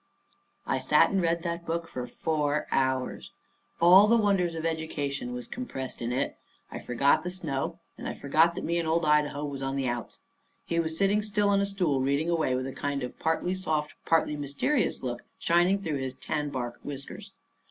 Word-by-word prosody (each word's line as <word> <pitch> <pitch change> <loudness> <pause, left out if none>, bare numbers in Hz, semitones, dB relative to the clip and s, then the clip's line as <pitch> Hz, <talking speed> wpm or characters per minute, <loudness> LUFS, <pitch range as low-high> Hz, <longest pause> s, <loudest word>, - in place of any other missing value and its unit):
I - - 0
sat - - +4
and 195 -1 +2
read 170 0 +1
that 170 -1 -3
book 170 0 -3
for 125 -4 -5
four 150 -2 -1
hours. 130 -1 -1 0.5
All 185 +5 +8
the 230 +2 +5
wonders 195 -6 +2
of 160 0 -4
education 145 -5 -2
was 125 0 -4
compressed 135 - -6
in 120 +1 -2
it. 130 +3 -1 0.3
I - - -5
forgot 130 +4 +2
the 180 - -3
snow, 170 -2 -3 0.2
and - - -5
I - - -4
forgot 160 +4 +3
that - - -5
me 170 +1 0
and 165 - -2
old 165 +1 +2
Idaho 150 -1 +2
was 140 -2 -5
on 135 0 -2
the 135 -2 -1
outs. 120 -1 -4 0.4
He 170 - 0
was 160 -1 0
sitting 200 +2 +3
still 210 -1 +1
on 200 0 +3
a 200 - +1
stool 180 -9 0
reading 140 +5 +1
away 155 -6 +1
with 130 0 -2
a 135 - -5
kind 140 -1 -2
of 125 - -7
partly 165 +3 0
soft 155 -5 -1
and - - -28
partly 165 -2 +2
mysterious 145 - -1
look 120 -1 -3 0.2
shining 175 +4 +3
through 160 -7 -2
his 130 -1 -4
tan 150 -1 -3
bark 120 -3 -4
whiskers. 140 -1 -7
155 Hz, 200 wpm, -28 LUFS, 135-170 Hz, 0.5 s, All